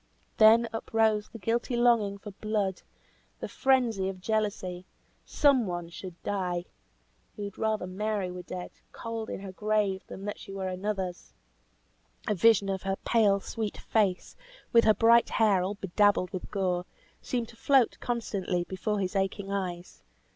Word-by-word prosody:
Then 225 +2 +7
uprose 220 -1 +1
the - - -9
guilty 235 +4 -1
longing 230 -4 +3
for 205 +1 -9
blood! 205 -2 -2 0.6
The - - -4
frenzy 235 -8 +2
of 190 -1 -7
jealousy! 190 -3 -2 0.4
Some 270 -6 +3
one 175 -1 -4
should 175 0 -9
die. 180 -3 -2 0.7
He 205 - -6
would 200 -1 -7
rather 220 -3 0
Mary 195 0 -2
were 180 0 -6
dead, 180 0 -7 0.2
cold 230 -1 -5
in - - -5
her 195 -1 -7
grave, 205 -1 0
than 195 - -8
that 205 - -4
she - - -10
were 195 -1 -4
another's. 185 -1 -4 0.9
A 210 - +2
vision 205 +1 +4
of 190 -1 -2
her 195 0 -1
pale, 210 -4 +4
sweet 220 0 -4
face, 200 -5 0 0.4
with 230 -1 +6
her 215 -1 +5
bright 230 +1 +5
hair 205 -4 +3
all 190 +3 -2
bedabbled 200 -1 +2
with 185 - -5
gore, 180 -3 -1 0.3
seemed 240 -3 -2
to - - -14
float 265 +1 +3
constantly 200 -7 -2
before 200 +3 -2
his 190 0 -2
aching 195 +1 -1
eyes. 180 -3 -4
200 Hz, 155 wpm, -29 LUFS, 185-220 Hz, 0.9 s, Then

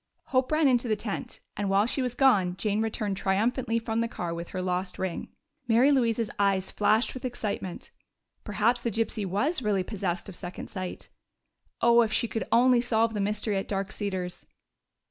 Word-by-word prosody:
Hope 255 +1 +2
ran 310 -1 +4
into 245 -2 +2
the 215 - +2
tent, 210 -1 -5
and 205 -1 -2
while 195 +2 +4
she 255 +3 +1
was 250 -1 -2
gone 195 -10 +3
Jane 210 +1 0
returned 215 -3 -2
triumphantly 225 +5 +1
from 225 0 -2
the 230 - +1
car 175 -7 -4
with 170 0 -5
her 185 - -5
lost 180 0 -2
ring. 185 -2 -3 0.4
Mary 240 +5 +5
Louise's 230 -4 +1
eyes 195 -2 +1
flashed 215 +3 +2
with 255 - -8
excitement: 210 -7 -4 0.5
perhaps 230 +3 +1
the 235 - -1
gypsy 220 -2 -1
was 260 - 0
really 205 -4 +1
possessed 185 -3 -3
of 195 - -8
second 180 0 -7
sight. 185 -3 -6 0.7
Oh, 235 0 +6
if 220 -2 +1
she 235 - +1
could 225 - -3
only 245 +1 +5
solve 230 -1 +1
that 210 - -2
mystery 210 +1 0
at 195 - -3
Dark 195 -1 -2
Cedars! 185 -3 -4
215 Hz, 185 wpm, -28 LUFS, 195-235 Hz, 0.7 s, Oh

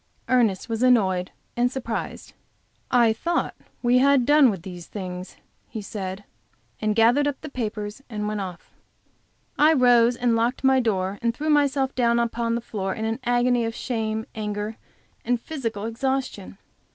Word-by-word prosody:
Ernest 230 -7 +2
was 225 -1 -3
annoyed 190 -8 +3 0.3
and 245 +1 +2
surprised. 245 -4 -5 0.6
"I 235 -3 +4
thought 340 +10 -1 0.3
we 245 +1 +4
had 275 -2 +4
done 290 -1 +6
with 190 -6 -4
these 180 -3 -9
things," 185 -2 -7 0.3
he 225 - -5
said, 195 -1 -5 0.6
and 215 -1 +1
gathering 240 +6 +4
up 285 -2 -2
the 305 - -7
papers 215 -2 -4
he 220 - -7
went 210 0 -2
off. 180 -3 -8 0.9
I 305 +2 +6
rose 245 -3 +5
and 240 -1 +1
locked 235 +4 0
my 265 0 +5
door 200 -4 -1
and 235 -1 0
threw 305 +3 -1
myself 280 -2 +2
down 235 -2 +2
upon 235 0 0
the 235 - -2
floor 195 -4 -4
in 220 - -3
an 225 +2 -2
agony 245 0 +2
of 225 0 -3
shame, 220 -3 -2
anger, 210 0 -4 0.5
and 245 0 0
physical 230 -7 -4
exhaustion. 230 - -3
230 Hz, 160 wpm, -24 LUFS, 210-255 Hz, 0.9 s, done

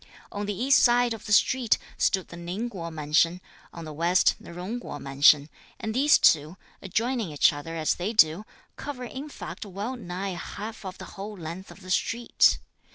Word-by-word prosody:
On 205 0 -4
the 205 - -2
east 270 +3 +5
side 240 -1 +4
of 225 - -9
the - - -5
street, 240 +2 +4 0.2
stood 190 -2 +1
the - - -9
Ning 180 +8 -4
Kuo 170 -5 -6
mansion; 160 +3 +1 0.3
on 170 -1 -9
the 155 - -7
west 170 +4 +3
the - - -12
Jung 185 +8 -5
Kuo 145 -10 -7
mansion; 140 +1 +4 0.3
and 220 - -3
these 280 +5 +5
two, 155 +3 +3 0.2
adjoining 225 0 -1
each 145 - +4
other 145 +3 -7
as 160 -1 +1
they 180 +5 -3
do, 175 -3 +4 0.3
cover 275 -3 -6
in 270 +4 -7
fact - - -8
well 205 +5 -5
nigh 195 -3 -5
half 210 +5 -7
of 185 -1 -6
the - - -9
whole 205 +1 -8
length 170 +3 -7
of - - -14
the 185 0 -8
street. 235 +6 +2
190 Hz, 190 wpm, -26 LUFS, 165-230 Hz, 0.3 s, east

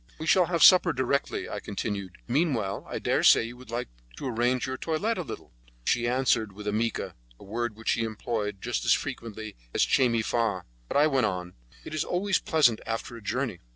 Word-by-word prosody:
"We 160 - -6
shall 180 +1 +4
have 170 -2 +2
supper 180 -3 +8
directly," 135 +1 -1
I - - -4
continued. 100 -2 -4
"Meanwhile, 120 - 0
I - - -3
dare - - +1
say - - +6
you 115 +1 -7
would 130 -2 -14
like 120 +2 -3 0.3
to - - -6
arrange 120 +1 +1
your 130 - -3
toilette 170 - -1
a - - 0
little?" 155 - -8 0.3
She 120 0 +2
answered 120 -4 +1
with 105 +2 -10
a 105 - 0
'mica', 115 +1 -1 0.3
a - - -13
word 115 +2 -3
which 110 +1 -4
she - - +2
employed 110 -2 -3
just 120 0 -1
as - - +5
frequently 110 -5 -4 0.2
as - - +4
'Che 130 -2 +3
me 115 -1 +1
fa', 110 -6 0 0.2
but - - -1
I 145 - +6
went 135 -6 +2
on: 90 -2 -4 0.3
"It - - -7
is 155 0 0
always 190 +2 0
pleasant 150 - +3
after 115 +1 -4
a 115 - -10
journey." 115 -1 -2
120 Hz, 210 wpm, -27 LUFS, 110-140 Hz, 0.3 s, supper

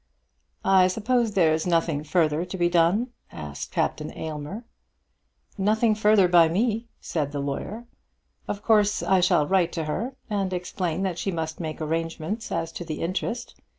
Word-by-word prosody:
"I 190 -1 +6
suppose 225 +3 +1
there's 160 -2 +3
nothing 165 -3 +1
further 155 0 +1
to 180 +1 -6
be 175 -1 +3
done?" 175 +8 +2 0.2
asked 75 -1 -7
Captain - - -1
Aylmer. 155 +8 -5 1.0
"Nothing 215 +3 +3
further 210 -3 +4
by 175 -2 +6
me," 220 +6 0
said 150 -4 -2
the 145 - -3
lawyer. 145 +12 -4 0.6
"Of 205 +1 -4
course 210 -2 +3
I 190 -1 +3
shall 175 -4 +3
write 175 0 +2
to 165 - -2
her, 230 - -3
and 195 -3 -1
explain 180 -1 -2
that 180 -3 -2
she - - -1
must 160 -2 -4
make 155 -3 -4
arrangements 165 +6 -3
as 165 -1 -2
to 175 - -6
the 155 -3 -5
interest. 230 +7 -3
180 Hz, 155 wpm, -25 LUFS, 160-210 Hz, 1.0 s, I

